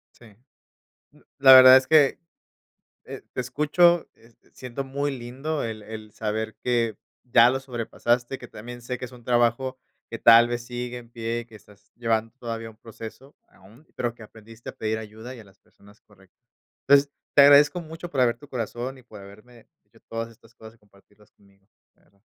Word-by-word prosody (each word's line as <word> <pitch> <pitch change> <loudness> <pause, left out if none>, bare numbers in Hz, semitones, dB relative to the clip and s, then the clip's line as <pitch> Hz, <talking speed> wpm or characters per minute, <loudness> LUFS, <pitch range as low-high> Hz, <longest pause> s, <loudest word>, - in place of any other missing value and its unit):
Sí. 115 -4 -18 0.8
Mm, - - -23 0.2
la 135 -1 +8
verdad 130 0 +10
es 130 0 +3
que, 155 -3 +4 0.9
eh, - - -9
te - - -2
escucho, 150 +7 +2
este, 115 0 -26
siento 125 +1 -7
muy 140 +2 -3
lindo 135 +6 -5
el 110 -2 -5
el 110 0 -10
saber 110 0 -4
que 120 -3 0 0.3
ya 120 -1 +5
lo 135 +1 -1
sobrepasaste, 120 0 -2
que 125 - -12
también 120 +3 -10
sé 125 +1 -5
que 125 - -6
es 125 - -13
un 120 -2 -15
trabajo 120 +2 0 0.3
que 115 - -7
tal 115 +1 +7
vez 120 0 -4
sigue 125 0 -6
en 120 -1 -13
pie, 115 0 -4
que 110 - -16
estás 100 -1 -20
llevando 115 -1 -1
todavía 115 -2 -6
un 110 - -18
proceso 115 +5 -12
aún, 110 - -21
pero 120 -1 -2
que 115 -2 -14
aprendiste 110 +2 -13
a - - -11
pedir 110 0 -2
ayuda 110 +3 -10
y - - -13
a - - -12
las 95 -1 -23
personas 105 +1 -23
correctas. 95 -3 -25 0.5
Pues, 140 0 +5 0.2
te 145 - +8
agradezco 145 +4 +6
mucho 165 +1 -9
por 135 - -2
abrir 120 -2 +2
tu 145 - -15
corazón 125 +2 -5
y - - -17
por 120 -4 -14
haberme 110 +4 -16 0.2
dicho 115 +2 -25
todas 115 0 -5
estas 115 0 -22
cosas 110 0 -14
y - - -27
compartirlas 105 0 -26
conmigo, 100 -1 -28 0.3
de - - -34
verdad. 100 0 -33
120 Hz, 190 wpm, -24 LUFS, 110-130 Hz, 0.9 s, verdad